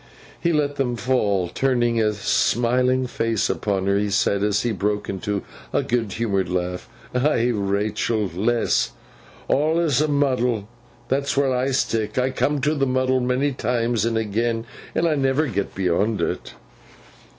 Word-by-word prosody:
He 170 - +1
let 145 -2 0
them 125 -3 0
fall, 105 -7 +1
turned 130 +4 +1
a 115 -2 +2
smiling 125 +5 +2
face 115 -3 0
upon 100 -2 -1
her, 100 0 +2
and 105 0 0
said, 100 +1 +2
as 105 0 +1
he 120 - 0
broke 105 +1 -1
into 100 +1 -3 0.3
a - - +1
good 115 -4 -1
humoured 100 -5 -1
laugh, 90 0 -3 0.2
'Ay, 125 -2 +2
Rachael, 105 +1 0
lass, 115 +6 +1 0.5
awlus 155 -1 +2
a 155 - +2
muddle. 125 -7 +1 0.4
That's 140 +1 0
where 135 -2 +2
I 130 +2 0
stick. 110 -5 -1
I 130 +1 +2
come 145 +2 0
to 150 +3 +2
the 140 -3 +1
muddle 130 0 +2
many 125 +3 +1
times 120 -2 0
and 115 -1 0
agen, 115 +2 -1 0.3
and 170 - +2
I 160 - +2
never 135 +1 +1
get 100 -7 -3
beyond 95 +3 +1
it. - - -3
120 Hz, 155 wpm, -23 LUFS, 105-130 Hz, 0.5 s, a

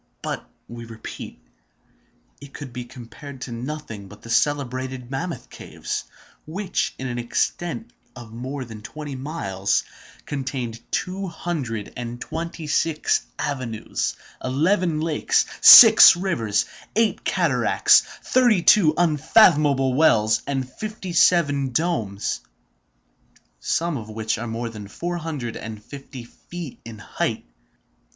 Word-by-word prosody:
But, - - -4 0.2
we 120 0 -9
repeat, 115 - -9 1.0
it 140 -1 -12
could 140 -5 -8
be 125 -1 -6
compared 130 +3 -11
to 125 - -6
nothing 115 -4 -6
but 105 +1 -15
the 115 - -8
celebrated 130 -1 -1
Mammoth 165 +6 -4
caves, - - -6 0.4
which, 185 +4 -2
in 130 - -6
an 120 -1 -3
extent 175 - -2 0.2
of 120 -3 -11
more 130 +3 -5
than 110 -2 -10
twenty 145 +5 -7
miles, 130 - -1 0.4
contain 135 -4 -4 0.2
two 190 +1 -3
hundred 145 - -4
and 120 0 -6
twenty 165 +2 -5
six 155 +1 0
avenues, 125 -6 -3 0.3
eleven 160 +5 +1
lakes, 160 -2 +1 0.2
seven 215 -6 +10
rivers, 115 - 0 0.3
eight 225 -1 +1
cataracts, - - +3 0.2
thirty 240 -8 +3
two 160 -3 +5
unfathomable 150 - +4
wells, 110 -7 +3
and 135 -2 -2
fifty 210 - -7
seven 145 -6 +3
domes, 115 - -1 1.2
some 170 -3 -1
of 110 -3 -8
which 110 0 -2
are 120 - -4
more 115 +1 -4
than 105 -3 -9
four 175 - -4
hundred 150 -8 -5
and 110 -1 -8
fifty 135 -3 -10
feet 165 +5 -10
in 115 -1 -9
height. 105 - -3
135 Hz, 120 wpm, -23 LUFS, 115-165 Hz, 1.2 s, seven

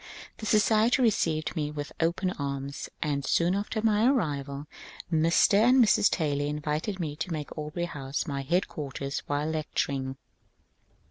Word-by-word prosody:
This 215 - -3
society 220 +3 +4
received 165 -11 +1
me 150 -3 -1
with 145 -1 -6
open 175 +3 +1
arms, 140 -2 -4
and 145 -2 -1
soon 175 +5 +2
after 210 +2 -2
my 220 +1 +3
arrival 145 - -1 0.5
Mr. 165 +5 +4
and 250 +4 +5
Mrs. 220 -4 +5
Taylor 145 -4 0
invited 150 +6 -2
me 155 -4 -3
to 160 +4 -4
make 150 -3 -4
Aubrey 155 +3 -3
House 140 -4 -4
my 140 -4 -3
headquarters 140 -3 -2
while 145 +1 -1
lecturing. 140 -4 -2
155 Hz, 140 wpm, -28 LUFS, 145-195 Hz, 0.5 s, and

